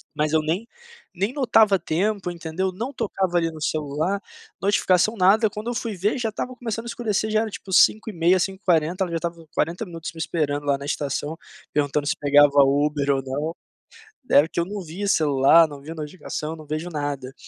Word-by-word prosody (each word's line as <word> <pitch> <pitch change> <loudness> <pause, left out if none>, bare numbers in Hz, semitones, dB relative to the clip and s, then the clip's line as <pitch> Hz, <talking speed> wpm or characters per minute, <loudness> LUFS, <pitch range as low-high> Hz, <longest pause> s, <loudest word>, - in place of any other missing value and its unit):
Mas 150 0 0
eu 160 - +4
nem 170 +9 -2 0.5
nem 195 +6 -1
notava 225 -7 +4
tempo, 185 +3 -1
entendeu, 175 +2 -3
não 230 +9 -5
tocava 190 -6 -1
ali 165 -1 +1
no 155 - -11
celular, 155 +5 -1 0.4
notificação 200 +1 +2
nada. 205 +4 +4
Quando 210 +3 -7
eu 240 - -3
fui 225 -3 -3
ver, 205 +8 0
já 230 -3 -1
estava 250 +4 -5
começando 230 -2 -4
a - - -7
escurecer. 220 -3 -1
Já 215 0 +2
era, 220 -2 -3
tipo 190 - -9
17:30, 185 -2 +4
17:40, 180 -2 0
ela 175 - -4
já 165 - 0
estava 170 -1 -5
40 175 +8 -1
minutos 165 -2 -7
me - - -15
esperando 150 -3 -1
lá 140 - +2
na 140 - -8
estação, 145 +2 -3 0.4
perguntando 145 0 0
se - - +1
pegava 145 0 +5
Uber 145 +1 +1
ou 135 -1 +1
não. 145 +5 -3 0.7
Era 145 +3 +6
que 170 - -4
eu 170 - +1
não 200 +1 -5
via 180 +5 -5
celular, 155 -1 +5
não 145 -1 -10
via 160 +3 -8
notificação, 155 0 -5
não 155 -1 -12
vejo 155 +4 -4
nada, 145 -4 -4
170 Hz, 190 wpm, -23 LUFS, 150-200 Hz, 0.7 s, Era